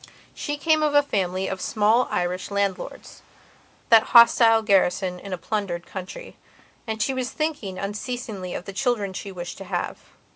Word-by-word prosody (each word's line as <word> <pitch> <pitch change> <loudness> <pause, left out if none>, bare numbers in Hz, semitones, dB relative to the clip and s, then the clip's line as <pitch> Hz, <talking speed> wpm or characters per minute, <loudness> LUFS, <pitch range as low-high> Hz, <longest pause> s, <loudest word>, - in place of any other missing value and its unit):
She 295 -1 -4
came 310 +1 +2
of 300 -1 +1
a 290 - +6
family 190 -7 -1
of 190 -1 -4
small 220 +3 +2
Irish 180 +1 -2
landlordsthat 200 -2 -3 0.7
hostile 230 0 +6
garrison 185 -3 +2
in 200 - -9
a 185 - -2
plundered 175 -2 -3
country. 190 - -8 0.5
And 220 0 -3
she 265 +5 0
was 255 -1 -2
thinking 295 -12 -3
unceasingly 205 -2 -5
of 180 - -6
the 195 - -7
children 210 -4 -1
she 195 +1 -6
wished 175 -1 -7
to 195 - -8
have. 180 -1 -3
205 Hz, 155 wpm, -24 LUFS, 185-245 Hz, 0.7 s, a